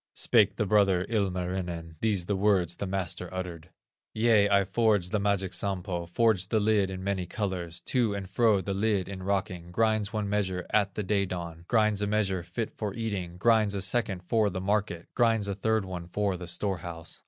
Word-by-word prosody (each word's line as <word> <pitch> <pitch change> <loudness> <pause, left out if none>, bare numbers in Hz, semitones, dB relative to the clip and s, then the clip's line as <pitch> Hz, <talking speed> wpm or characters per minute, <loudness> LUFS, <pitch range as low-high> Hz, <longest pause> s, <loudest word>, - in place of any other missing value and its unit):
Spake 105 -4 +3
the 105 - 0
brother, 95 -2 +3
Ilmarinen, 90 -5 -2
These 105 -6 +1
the 100 - 0
words 95 -4 +2
the 100 - -3
master 95 -2 -3
uttered: 90 -3 -6 0.5
"Yea, 110 -2 +4
I 100 -1 +4
forged 100 -2 +1
the 105 - +1
magic 100 -2 0
Sampo, 90 -2 -1
Forged 95 -1 +2
the 110 - +2
lid 105 -2 +2
in 95 0 -6
many 95 -2 -2
colors; 90 -4 -3
To 120 -6 0
and 100 -2 -5
fro 105 0 +3
the 100 +2 -3
lid 100 -1 0
in 95 -1 -7
rocking 95 -3 -2
Grinds 110 0 +1
one 105 -2 -2
measure 95 -3 -1
at 100 -2 +2
the 105 - -2
day 100 0 +1
dawn, 85 -2 -6
Grinds 110 -3 +2
a 105 - 0
measure 100 -3 0
fit 90 +6 -4
for 105 -3 -4
eating, 100 -7 -4
Grinds 110 0 +3
a 100 - -2
second 95 -2 0
for 110 +3 +2
the 95 -1 -4
market, 95 -3 -1
Grinds 115 -4 +2
a 100 - -1
third 110 +1 0
one 90 -2 -6
for 100 +1 -1
the 90 -1 -7
store 95 +2 -2
house. 85 -1 -7
100 Hz, 195 wpm, -28 LUFS, 90-105 Hz, 0.5 s, Yea